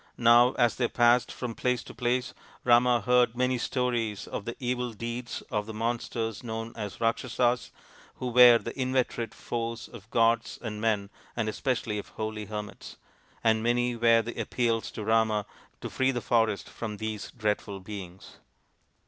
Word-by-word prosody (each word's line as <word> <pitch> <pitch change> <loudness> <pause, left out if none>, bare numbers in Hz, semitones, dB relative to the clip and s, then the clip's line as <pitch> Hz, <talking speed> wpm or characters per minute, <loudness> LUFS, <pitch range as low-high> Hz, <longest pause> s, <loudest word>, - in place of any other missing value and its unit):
Now 120 +2 +6
as 120 -2 +2
they 125 - +2
passed 120 +1 +3
from 125 -2 -5
place 125 0 -1
to - - -11
place 125 +1 -1 0.3
Rama 120 0 +5
heard 125 +1 +3
many 125 0 +1
stories 120 -5 -1
of 100 - -5
the 120 - -4
evil 125 -2 -2
deeds 120 +3 -5
of 105 -1 -1
the 110 - -7
monsters 115 -1 -2
known 115 0 -5
as 105 -3 -5
the 115 - -1
Rakshasas, 120 +2 +1 0.5
who 125 - -4
were 120 -1 +8
the 115 - -6
inveterate 130 -3 -1
foes 115 0 -4
of 115 -2 -13
gods 115 0 +2
and 105 -3 -5
men 105 -3 0 0.2
and 115 -2 -1
especially 115 -2 -1
of - - -8
holy 110 -1 -4
hermits; 105 0 -7 0.5
and 110 -1 +3
many 120 +1 +1
were 115 -1 +4
the 120 +1 -4
appeals 115 0 0
to 110 - -5
Rama 110 -1 +2 0.4
to - - -5
free 130 0 +1
the 125 -2 0
forest 115 -4 +1
from 105 -3 -6
these 110 -1 -4
dreadful 105 -3 -2
beings. 95 -2 -9
115 Hz, 165 wpm, -28 LUFS, 110-120 Hz, 0.5 s, were